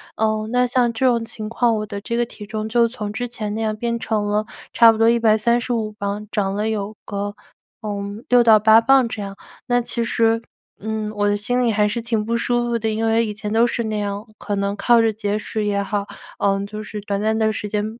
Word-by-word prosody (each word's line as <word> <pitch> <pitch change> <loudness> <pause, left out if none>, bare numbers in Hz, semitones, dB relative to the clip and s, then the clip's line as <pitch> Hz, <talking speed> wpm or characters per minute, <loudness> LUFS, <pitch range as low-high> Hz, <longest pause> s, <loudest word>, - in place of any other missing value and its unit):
呃， 215 0 0
那 250 0 +3
像 245 -1 +2
这 260 +4 0
种 235 -2 +2
情 215 -1 -7
况 235 0 +2
我 215 0 -2
的 205 -1 -6
这 235 +3 -4
个 240 - +1
体 210 -3 -11
重 215 0 -4
就 235 +1 +3
从 215 -3 -5
之 245 +3 -3
前 215 -3 -5
那 220 - -3
样 215 -1 -1
变 235 +1 -2
成 215 -2 -1
了 210 +1 0 0.3
差 230 -1 +7
不 225 - -3
多 225 +1 +4
135 235 0 +2
磅， 200 0 -4
长 195 -2 -1
了 215 +1 -1
有 215 -1 -3
个， 205 0 -4 0.5
呃， 215 - -5 0.4
6 245 -1 +6
到 220 -2 +7
8 220 +1 +7
磅 260 0 +4
这 215 - -5
样。 195 0 -6 0.3
那 245 0 +2
其 235 0 -2
实， 230 -1 +2 0.4
嗯， 215 0 -3
我 205 0 +1
的 205 - +2
心 245 +5 0
里 235 - +2
还 210 0 +2
是 230 +3 -2
挺 225 -2 -1
不 235 +1 0
舒 240 0 0
服 235 -1 0
的， 220 0 -1
因 220 +1 -1
为 225 +1 +2
以 210 - -4
前 210 0 -6
都 230 +2 +4
是 235 0 -2
那 215 -1 -2
样， 205 0 -3
可 205 - -3
能 200 0 -1
靠 235 +3 +4
着 225 -1 +2
节 210 -1 -2
食 215 0 -3
也 200 -1 0
好， 200 0 -2 0.3
呃， 195 0 +2
就 210 +1 -7
是 210 -1 -7
短 200 -1 -2
暂 220 +1 +1
的 220 -1 +2
时 210 0 -4
间 210 0 -1
220 Hz, 245 characters per minute, -21 LUFS, 210-235 Hz, 0.5 s, 差